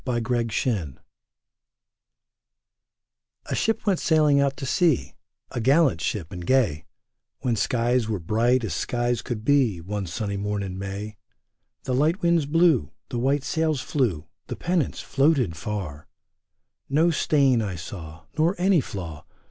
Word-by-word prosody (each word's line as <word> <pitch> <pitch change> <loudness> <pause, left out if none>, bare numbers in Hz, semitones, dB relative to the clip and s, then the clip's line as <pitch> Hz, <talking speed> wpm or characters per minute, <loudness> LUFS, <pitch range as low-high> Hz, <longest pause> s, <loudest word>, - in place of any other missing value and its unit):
OUT 120 -1 -1
AND 120 -2 0
IN 90 - -2 2.5
A - - -4
SHIP 225 0 0
went 195 -4 +2
sailing 150 -3 +4
out 140 -1 0
to 135 - -5
sea, 160 +1 +1 0.4
A 120 - -3
gallant 135 - +3
ship 90 -6 -3
and 90 -1 -6
gay, 105 - +1 0.6
When 120 -2 0
skies 120 +2 +1
were 105 - 0
bright 115 +8 +1
as 100 -8 -2
skies 120 +6 -1
could 115 -4 -5
be. 130 -10 +3
One 100 +3 -4
sunny 100 +3 -3
morn 105 0 -2
in 95 -1 -5
May. 100 +2 -6 0.7
The 130 - -2
light 155 +8 +1
winds 170 -4 +3
blew, 160 - +3 0.2
The 120 - -3
white 135 +3 +1
sails 160 -1 0
flew, 110 - -1 0.2
The - - -4
pennants 175 -3 -1
floated 135 - +2
far; 85 -5 -5 0.8
No 160 +5 +3
stain 140 -6 +3
I 100 -4 -3
saw. 80 -1 -8
Nor 165 +4 +2
any 185 -2 +3
flaw. 85 - -7
120 Hz, 145 wpm, -25 LUFS, 100-145 Hz, 2.5 s, sailing